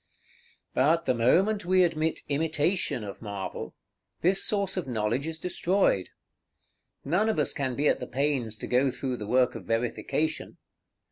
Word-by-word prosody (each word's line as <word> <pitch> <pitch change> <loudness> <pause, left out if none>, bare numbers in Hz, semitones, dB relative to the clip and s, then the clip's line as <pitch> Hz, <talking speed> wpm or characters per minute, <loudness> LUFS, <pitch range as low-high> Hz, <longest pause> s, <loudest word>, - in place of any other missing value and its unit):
§ - - -49
XLIII. - - -33
But 160 +6 +3
the - - +2
moment 185 - +3
we 185 +1 +4
admit 160 -2 0
imitation 155 - 0
of 100 -1 -8
marble, 100 -3 -6 0.5
this 190 +3 +3
source 200 -2 0
of 185 -6 -3
knowledge 120 +4 -1
is 160 0 -4
destroyed. 180 - +1 1.0
None 180 +10 +2
of 220 - 0
us 150 - +1
can 130 -3 -2
be 145 +3 +1
at - - +2
the - - -5
pains 130 -4 -1
to - - -6
go 130 +2 +3
through 130 0 -3
the 105 - -6
work 125 +2 +3
of - - -8
verification. 125 +7 -2
145 Hz, 165 wpm, -27 LUFS, 125-175 Hz, 1.0 s, we